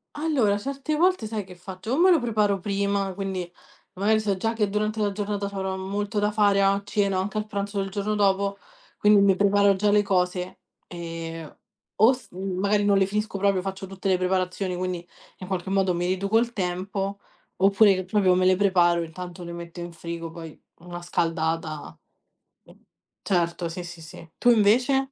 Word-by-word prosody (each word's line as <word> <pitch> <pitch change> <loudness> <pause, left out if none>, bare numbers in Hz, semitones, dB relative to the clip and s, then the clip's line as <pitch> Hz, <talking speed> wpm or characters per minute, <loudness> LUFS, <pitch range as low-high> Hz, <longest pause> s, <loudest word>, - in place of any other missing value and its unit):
Allora 285 -10 +1
certe 275 +7 -3
volte 365 -7 +2
sai 215 -2 -4
che 185 -1 -12
faccio? 185 +5 -6
O - - +1
me 365 +3 +6
lo 340 - +5
preparo 210 -5 +1
prima, 200 0 -1
quindi 190 -2 -4 0.4
magari 210 +3 +2
so 210 -2 0
già 225 +4 -1
che 220 -2 0
durante 215 +2 -1
la 205 -2 0
giornata 205 0 -2
c'avrò 190 -1 -3
molto 200 +3 -2
da 210 0 +1
fare 205 -2 +3
a 195 0 +3
cena, 200 -2 0
anche 195 +3 -2
al 210 - -1
pranzo 200 -1 -4
del 195 0 -2
giorno 205 +2 -2
dopo, 200 -1 +1 0.4
quindi 210 -1 +5
mi 195 -1 +4
preparo 200 0 +4
già 205 +2 +2
le 205 0 +5
cose; 180 -2 -1 0.3
ehm, 165 -2 -7 0.4
o 225 +5 +6
s 260 -1 -6
magari 195 +3 0
non 200 -1 +3
le 195 - +4
finisco 210 +1 -2
proprio, 195 -1 +2
faccio 195 0 -5
tutte 195 0 -4
le 185 - +3
preparazioni, 185 0 -1
quindi 180 -1 -4 0.3
in 185 - -9
qualche 190 -1 -3
modo 190 -2 +2
mi 175 +1 -1
riduco 195 +4 +1
il 235 0 -1
tempo, 195 0 -3 0.4
oppure 195 0 +4
proprio 185 -1 +2
me 185 - +2
le 185 0 +4
preparo, 175 -3 +3
intanto 175 +2 -8
le 170 - -7
metto 170 0 -8
in 175 0 -6
frigo, 170 0 -6
poi 165 -1 -10 0.2
una 175 0 -8
scaldata 165 -2 -2 0.7
mh. - - -18 0.5
Certo, 170 -2 0
sì 175 +2 -6
sì, 175 -1 -10
sì. 160 +1 -12
Tu 245 - +3
invece? 250 +5 +3
195 Hz, 185 wpm, -25 LUFS, 180-205 Hz, 0.7 s, me